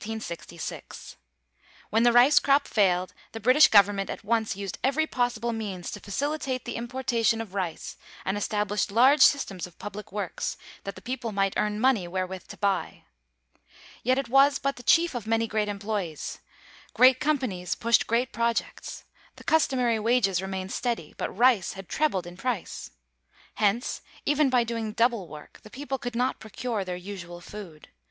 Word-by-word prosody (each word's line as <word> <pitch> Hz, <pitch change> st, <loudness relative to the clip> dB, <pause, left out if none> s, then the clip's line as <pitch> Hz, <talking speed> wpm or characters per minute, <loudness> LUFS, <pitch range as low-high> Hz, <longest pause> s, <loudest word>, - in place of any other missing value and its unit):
When 225 Hz, -, +3 dB
the 240 Hz, 0 st, +5 dB
rice 245 Hz, +5 st, +7 dB
crop 280 Hz, +1 st, +3 dB
failed 185 Hz, -3 st, +2 dB, 0.2 s
the 225 Hz, -, -5 dB
British 255 Hz, +8 st, +6 dB
government 200 Hz, -1 st, +4 dB
at -, -, -6 dB
once 220 Hz, -1 st, 0 dB
used 195 Hz, -2 st, -6 dB
every 280 Hz, +4 st, +2 dB
possible 240 Hz, -4 st, -1 dB
means 200 Hz, -6 st, -5 dB
to -, -, -6 dB
facilitate 270 Hz, +4 st, -3 dB
the 240 Hz, -, -4 dB
importation 235 Hz, -2 st, 0 dB
of 220 Hz, -4 st, -6 dB
rice 185 Hz, -5 st, -4 dB, 0.3 s
and 190 Hz, -, 0 dB
established 210 Hz, 0 st, -1 dB
large 260 Hz, +7 st, +5 dB
systems 195 Hz, -, +3 dB
of 175 Hz, -, -20 dB
public 205 Hz, 0 st, -8 dB
works 200 Hz, -3 st, -3 dB, 0.3 s
that 195 Hz, -, -5 dB
the -, -, -13 dB
people 250 Hz, -2 st, -4 dB
might 195 Hz, -1 st, +1 dB
earn 210 Hz, 0 st, 0 dB
money 235 Hz, -7 st, +2 dB
wherewith 185 Hz, +1 st, -4 dB
to -, -, -10 dB
buy. 200 Hz, -1 st, -1 dB, 1.0 s
Yet 255 Hz, +2 st, +2 dB
it 275 Hz, -, -1 dB
was 275 Hz, +2 st, +5 dB
but 275 Hz, 0 st, -1 dB
the -, -, -10 dB
chief 335 Hz, +7 st, +4 dB
of 235 Hz, -4 st, -5 dB
many 225 Hz, 0 st, +2 dB
great 215 Hz, -1 st, -1 dB
employes. 200 Hz, -5 st, -4 dB, 0.6 s
Great 255 Hz, 0 st, +6 dB
companies 250 Hz, -12 st, -1 dB
pushed 235 Hz, 0 st, +2 dB
great 235 Hz, +2 st, +1 dB
projects. 235 Hz, +1 st, -2 dB, 0.3 s
The -, -, -14 dB
customary 255 Hz, -7 st, +2 dB
wages 215 Hz, -5 st, +2 dB
remained 190 Hz, 0 st, -4 dB
steady; 235 Hz, -10 st, -3 dB
but -, -, -3 dB
rice 235 Hz, -3 st, +3 dB
had 195 Hz, -1 st, -9 dB
trebled 195 Hz, -, 0 dB
in 175 Hz, 0 st, -10 dB
price. 235 Hz, -3 st, -3 dB, 0.6 s
Hence, 215 Hz, +3 st, 0 dB, 0.2 s
even 295 Hz, -1 st, +3 dB
by 250 Hz, -2 st, +3 dB
doing 225 Hz, -2 st, -3 dB
double 230 Hz, -5 st, +1 dB
work 150 Hz, -1 st, -12 dB
the 215 Hz, -, -13 dB
people 270 Hz, +2 st, -5 dB
could 245 Hz, 0 st, -5 dB
not 250 Hz, +2 st, 0 dB
procure 220 Hz, 0 st, -4 dB
their 180 Hz, -1 st, -4 dB
usual 180 Hz, -2 st, -8 dB
food. 175 Hz, -4 st, -11 dB
225 Hz, 160 wpm, -27 LUFS, 195-250 Hz, 1.0 s, rice